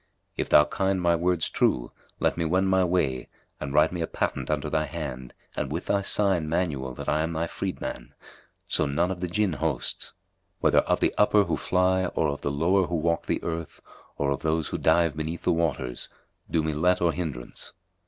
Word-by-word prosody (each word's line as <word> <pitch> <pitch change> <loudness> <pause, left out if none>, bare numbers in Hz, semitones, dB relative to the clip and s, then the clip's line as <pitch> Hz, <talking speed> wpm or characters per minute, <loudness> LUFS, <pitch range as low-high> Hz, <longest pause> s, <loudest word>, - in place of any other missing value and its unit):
If - - -2
thou 75 - +7
kind 95 -1 0
my 85 -1 +3
words 85 -1 +1
true, - - +1 0.3
let - - +2
me 85 - -1
wend 95 +4 +2
my 95 0 +4
way 80 -9 0 0.3
and 70 - -4
write 75 +2 +4
me 90 -1 -3
a 80 - -1
patent - - -2
under 75 -1 0
thy 75 0 0
hand 65 -7 -6 0.2
and 65 - -2
with 85 +4 -3
thy 100 - +1
sign 95 -5 +1
manual 70 -7 -1
that - - -7
I 75 - +2
am 80 +1 -1
thy 80 +1 -1
freedman, 65 -6 -5 0.5
so 75 - +1
none 85 +6 +1
of 90 -2 -5
the 90 - -1
Jinn 100 +1 0
hosts, 75 -4 -2 0.5
whether - - +4
of - - 0
the - - +2
upper 105 0 +5
who - - -1
fly 95 0 +2
or 80 -3 0
of 70 - -4
the - - -1
lower 85 +6 +2
who 85 - -2
walk 85 +1 0
the - - -1
earth 85 -1 -4 0.4
or 70 -1 0
of 70 - -2
those 80 -1 0
who - - -3
dive 80 -1 +3
beneath 80 +2 -4
the 90 - +3
waters, 80 -7 -2 0.4
do 80 - +1
me 80 0 -1
let 90 +5 +2
or 85 -1 +3
hindrance." 75 -9 -5
80 Hz, 205 wpm, -26 LUFS, 75-90 Hz, 0.5 s, thou